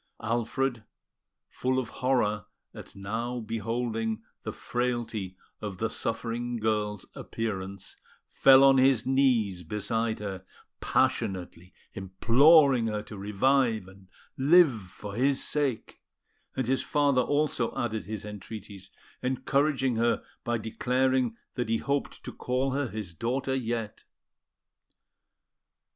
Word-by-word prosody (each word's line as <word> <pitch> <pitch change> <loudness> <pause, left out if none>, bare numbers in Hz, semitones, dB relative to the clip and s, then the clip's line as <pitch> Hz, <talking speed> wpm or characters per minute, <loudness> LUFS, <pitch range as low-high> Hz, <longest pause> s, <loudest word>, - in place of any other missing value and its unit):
Alfred, 120 +2 -1 0.6
full 130 +1 -1
of 125 -3 -1
horror 120 -5 0 0.3
at - - -11
now 115 +5 -3
beholding 115 0 -2 0.2
the - - -4
frailty 120 -6 -3 0.2
of 100 -3 -5
the 115 +3 -1
suffering 120 +1 -3
girl's 105 -2 -1
appearance, 100 -4 -5 0.3
fell 135 0 +6
on 135 -1 +6
his 130 -3 +4
knees 125 -9 +2
beside 110 +5 -2
her, 95 -3 -6 0.4
passionately 90 -1 -1 0.2
imploring 125 - +5
her 105 -1 -2
to 105 - -10
revive 110 +1 +1
and 95 0 -16 0.3
live 160 +3 +6
for 100 +2 -9
his 135 +5 +1
sake; 140 -6 -2 0.5
and 130 - -1
his 130 +2 +1
father 145 -3 +2
also 145 -3 0
added 110 -2 -2
his 105 0 -6
entreaties, 105 -1 -9 0.3
encouraging 130 0 +1
her 115 +1 +1 0.2
by 120 0 0
declaring 125 +2 0 0.2
that 120 -2 -3
he 115 - +2
hoped 140 +4 -2
to - - -7
call 130 +2 -1
her 140 0 -1
his 105 -6 -6
daughter 130 - -1
yet. 115 -4 -3
115 Hz, 115 wpm, -28 LUFS, 105-130 Hz, 0.6 s, fell